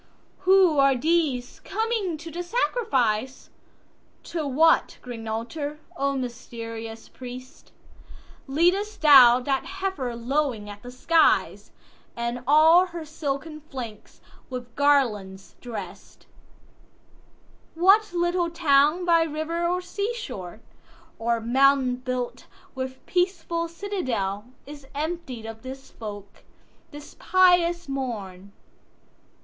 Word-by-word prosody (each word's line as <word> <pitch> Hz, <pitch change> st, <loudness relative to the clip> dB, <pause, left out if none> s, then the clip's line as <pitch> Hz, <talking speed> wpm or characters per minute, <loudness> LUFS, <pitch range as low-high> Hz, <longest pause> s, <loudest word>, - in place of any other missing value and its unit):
4.Who 370 Hz, -5 st, +5 dB
are 275 Hz, -1 st, +5 dB
these 290 Hz, -4 st, 0 dB
coming 430 Hz, -5 st, -2 dB
to 330 Hz, +2 st, -9 dB
the 345 Hz, +3 st, -4 dB
sacrifice? 265 Hz, -, -1 dB, 0.7 s
To 325 Hz, -3 st, -4 dB
what 305 Hz, +5 st, +3 dB
green 230 Hz, -3 st, -7 dB
altar, 285 Hz, +7 st, -4 dB, 0.2 s
O 275 Hz, 0 st, -1 dB
mysterious 230 Hz, -2 st, -7 dB
priest, 255 Hz, 0 st, -11 dB, 0.8 s
Lead'st 365 Hz, +9 st, +1 dB
thou 260 Hz, -5 st, +8 dB
that 270 Hz, +1 st, -1 dB
heifer 380 Hz, -11 st, -3 dB
lowing 245 Hz, -2 st, -1 dB
at 205 Hz, 0 st, -11 dB
the 245 Hz, -, -10 dB
skies, 315 Hz, +6 st, +2 dB, 0.4 s
And 235 Hz, +1 st, -3 dB
all 320 Hz, +5 st, +6 dB
her 340 Hz, -2 st, -7 dB
silken 305 Hz, 0 st, -5 dB
flanks 235 Hz, -6 st, -8 dB, 0.3 s
with 245 Hz, -2 st, -7 dB
garlands 215 Hz, -10 st, +1 dB
drest? 240 Hz, -2 st, -9 dB, 1.5 s
What 390 Hz, +5 st, +4 dB
little 345 Hz, 0 st, 0 dB
town 320 Hz, +1 st, +3 dB
by 335 Hz, -1 st, +4 dB
river 325 Hz, +2 st, -2 dB
or 360 Hz, +1 st, 0 dB
sea 405 Hz, +6 st, -3 dB
shore, 220 Hz, -, -7 dB, 0.6 s
Or 235 Hz, 0 st, 0 dB
mountain 260 Hz, +2 st, +3 dB
built 255 Hz, -1 st, -4 dB, 0.3 s
with 260 Hz, 0 st, -6 dB
peaceful 345 Hz, -2 st, -1 dB
citadel, 260 Hz, -, -3 dB, 0.2 s
Is 285 Hz, -1 st, -11 dB
emptied 300 Hz, -6 st, -4 dB
of 225 Hz, 0 st, -8 dB
this 265 Hz, +1 st, -9 dB
folk, 205 Hz, -2 st, -9 dB, 0.5 s
this 290 Hz, 0 st, -12 dB
pious 350 Hz, -2 st, +3 dB
morn? 205 Hz, -8 st, -5 dB
275 Hz, 105 wpm, -25 LUFS, 245-340 Hz, 1.5 s, thou